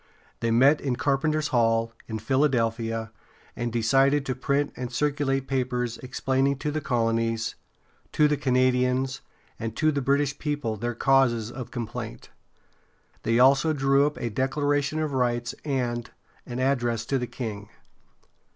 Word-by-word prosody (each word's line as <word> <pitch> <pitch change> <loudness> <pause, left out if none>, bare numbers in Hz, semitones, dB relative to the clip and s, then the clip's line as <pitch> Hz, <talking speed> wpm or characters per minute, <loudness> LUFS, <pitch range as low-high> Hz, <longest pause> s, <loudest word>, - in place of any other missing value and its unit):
They 115 - 0
met 135 +6 +5
in 135 -3 -1
Carpenter's 150 +3 0
Hall, 115 -1 +2
in 110 - -3
Philadelphia, 115 -3 0 0.4
and 120 0 -3
decided 135 +5 +3
to 130 - -1
print 140 +3 -1
and 125 0 -5
circulate 135 -1 0
papers 125 -3 -1
explaining 135 +1 0
to 150 +2 -2
the 155 +1 -2
colonies, 115 -2 0 0.6
to 150 - +4
the 150 - +1
Canadians, 130 -1 +1 0.4
and 115 -1 -4
to 155 0 +3
the 140 -1 -1
British 140 +2 +1
people 145 -7 -2
their 120 +3 -3
causes 120 -3 +2
of 120 -1 -7
complaint. 115 - -6 0.9
They 115 0 +1
also 135 +5 +5
drew 135 0 +3
up 150 - -5
a 120 - -3
declaration 145 +4 0
of 155 -2 -1
rights 120 -2 0
and 125 -5 -2 0.4
an 120 - -5
address 120 -4 0
to 135 +2 0
the 125 - -3
king. 110 -4 -6
130 Hz, 140 wpm, -26 LUFS, 120-140 Hz, 0.9 s, met